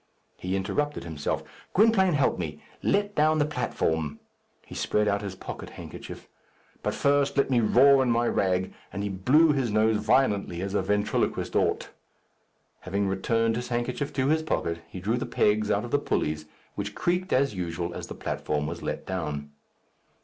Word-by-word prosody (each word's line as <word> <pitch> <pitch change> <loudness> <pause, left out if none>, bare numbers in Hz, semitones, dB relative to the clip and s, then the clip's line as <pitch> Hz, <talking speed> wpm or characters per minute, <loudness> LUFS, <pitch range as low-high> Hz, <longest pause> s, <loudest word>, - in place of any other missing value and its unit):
He 90 +1 -3
interrupted 145 +10 -1
himself. 80 -3 -3 0.3
"Gwynplaine, 195 -3 +5
help 140 -9 +2
me. 75 -4 -5 0.2
Let 205 +1 +1
down 155 -1 +3
the 145 - +3
platform." 80 - -1 0.5
He - - -11
spread 105 0 +1
out 100 0 +1
his 100 -2 -5
pocket - - -7
handkerchief. - - -9 0.5
"But - - -1
first 140 0 +2
let 140 -1 +2
me 125 - +4
roar 135 +5 +6
in 130 - +1
my 120 0 +2
rag," 95 -1 0 0.2
and 100 0 -4
he 100 - -1
blew 130 - +4
his 135 -5 0
nose 110 +1 +3
violently 105 -5 +2
as 100 0 -3
a 100 - +2
ventriloquist 105 +2 0
ought. - - +1 0.9
Having 100 +1 -1
returned 115 +4 +1
his 120 +1 -3
handkerchief 125 +4 -2
to 130 0 +1
his 160 +1 +3
pocket, 85 - -1
he 95 - -7
drew 110 +6 0
the 125 +1 -3
pegs 105 -2 +2
out 105 +2 +1
of 120 - -8
the 145 - +3
pulleys, 75 - -1 0.3
which - - -5
creaked 180 +2 0
as 135 0 +2
usual 85 -2 -3
as - - -6
the - - -7
platform 75 -1 -2
was 85 +2 -5
let - - -4
down. 75 -6 -4
110 Hz, 175 wpm, -27 LUFS, 95-140 Hz, 0.9 s, roar